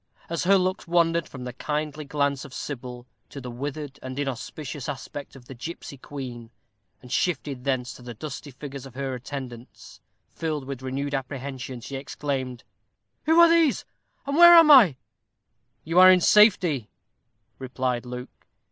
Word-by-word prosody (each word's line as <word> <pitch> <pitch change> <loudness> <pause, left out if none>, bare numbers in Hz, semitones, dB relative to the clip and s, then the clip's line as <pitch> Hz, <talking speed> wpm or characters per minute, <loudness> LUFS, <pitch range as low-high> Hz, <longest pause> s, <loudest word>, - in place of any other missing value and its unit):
As 170 +1 -2
her 195 +2 +6
looks 185 -1 -1
wandered 170 -1 +2
from 130 -2 -9
the 125 0 -6
kindly 150 +2 -3
glance 140 -1 -1
of 130 - -11
Sybil 125 -3 -6 0.2
to 140 - -8
the 125 -2 -7
withered 145 +3 -6
and 130 0 -7
inauspicious 140 +1 -5
aspect 140 +1 -7
of 130 -2 -14
the 135 - -10
gipsy 140 +3 -8
queen, 125 -4 -8 0.5
and 125 - -12
shifted 140 -7 -1
thence 130 -2 -1
to - - -14
the 120 -1 -9
dusky 145 +3 -7
figures 140 0 -9
of 130 - -16
her 135 -1 -3
attendants, 125 -2 -9 0.3
filled 155 -4 -3
with 135 -1 -6
renewed 135 +2 -3
apprehension, 130 -2 -5
she 135 +3 -6
exclaimed, 135 -3 -4 0.6
"Who 320 +2 +4
are 340 - +9
these, 330 -4 +3 0.4
and 280 0 -2
where 345 0 +10
am 330 -2 +8
I?" 220 - +8 0.9
"You 165 +3 +2
are 185 0 +10
in 185 -1 +7
safety," 180 - +4 0.7
replied 130 -2 -2
Luke. 125 0 -9
140 Hz, 155 wpm, -25 LUFS, 130-160 Hz, 0.9 s, where